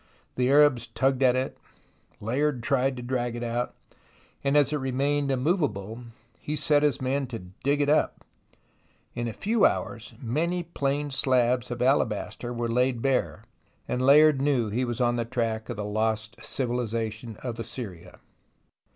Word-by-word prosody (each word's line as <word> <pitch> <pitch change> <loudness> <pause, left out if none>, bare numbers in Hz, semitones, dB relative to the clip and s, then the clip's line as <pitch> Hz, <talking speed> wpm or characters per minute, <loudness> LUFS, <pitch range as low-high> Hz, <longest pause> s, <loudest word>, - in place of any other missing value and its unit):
The 125 0 +1
Arabs 140 -4 +5
tugged 135 -1 0
at 130 -1 +5
it, 130 +1 -2 0.6
Layard 125 +3 -1
tried 135 0 +1
to 125 - -6
drag 120 -1 -2
it 120 - -4
out, 120 +1 -2 0.7
and 140 +1 +3
as 145 0 +3
it - - +1
remained 140 +2 0
immovable, 125 - -1 0.3
he 150 - -3
set 145 0 +3
his 150 -1 +2
men 135 +1 -1
to 120 -2 -5 0.2
dig 145 +1 +1
it 145 - +2
up. 150 +2 +1 0.9
In 120 0 -3
a - - -2
few 215 - 0
hours, 115 -1 0
mxany 165 +8 -1
plain 145 +1 -1
slabs 125 -2 +2
of 120 0 -2
alabaster 120 -2 0
were 120 -1 -2
laid 125 0 +1
bare, 135 -2 0 0.4
and 125 - -1
Layard 145 +1 +6
knew 135 -6 +1
he 120 +5 0
was 120 0 -4
on 120 -1 +2
the 120 - 0
track 115 -2 -2
of 120 - -4
the 105 - -3
lost 110 +2 -2
civilization 115 -3 -3
of 120 -3 -4
Assyria. 110 -6 -6
125 Hz, 160 wpm, -27 LUFS, 115-140 Hz, 0.9 s, Layard